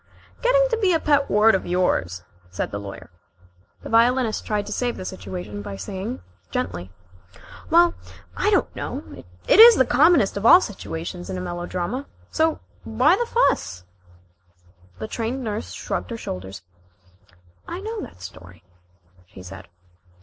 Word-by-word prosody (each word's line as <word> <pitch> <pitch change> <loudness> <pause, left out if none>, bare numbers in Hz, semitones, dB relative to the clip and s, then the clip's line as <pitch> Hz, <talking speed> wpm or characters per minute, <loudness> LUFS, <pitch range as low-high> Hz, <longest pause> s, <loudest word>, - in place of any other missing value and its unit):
"Getting - - +4
to 460 - +1
be 390 -5 +2
a 325 - +2
pet 285 -2 +2
word 215 +2 +5
of 190 - -1
yours," 90 - 0 0.3
said 95 - -4
the 100 - -4
Lawyer. 100 -3 -10 0.7
The - - -7
Violinist 235 0 +2
tried 210 -1 -1
to 210 - -8
save 245 +1 -2
the 185 - -7
situation 95 - -7
by 100 -1 -7
saying 95 - -6 0.3
gently: 85 +2 -4 0.8
"Well, 340 +1 +5 0.4
I - - +1
don't 405 - +1
know. - - -5 0.4
It - - +5
is 465 +1 +11
the 260 - +3
commonest 270 - +4
of 200 - -4
all 295 +10 +9
situations 175 - -6
in 185 - -4
a - - -4
melodrama. 175 +8 -4 0.2
So 320 0 +1 0.2
why 250 +10 +3
fuss?" 90 - 0 1.1
The 110 - -5
Trained 240 - -3
Nurse 215 -1 -4
shrugged - - -4
her 230 - -5
shoulders. 95 - -7 1.0
"I 345 - -5
know 435 +2 -5
that 90 - -11
story," 90 -1 -12 0.6
she 95 -1 -13
said. 95 +1 -11
205 Hz, 150 wpm, -23 LUFS, -, 1.1 s, is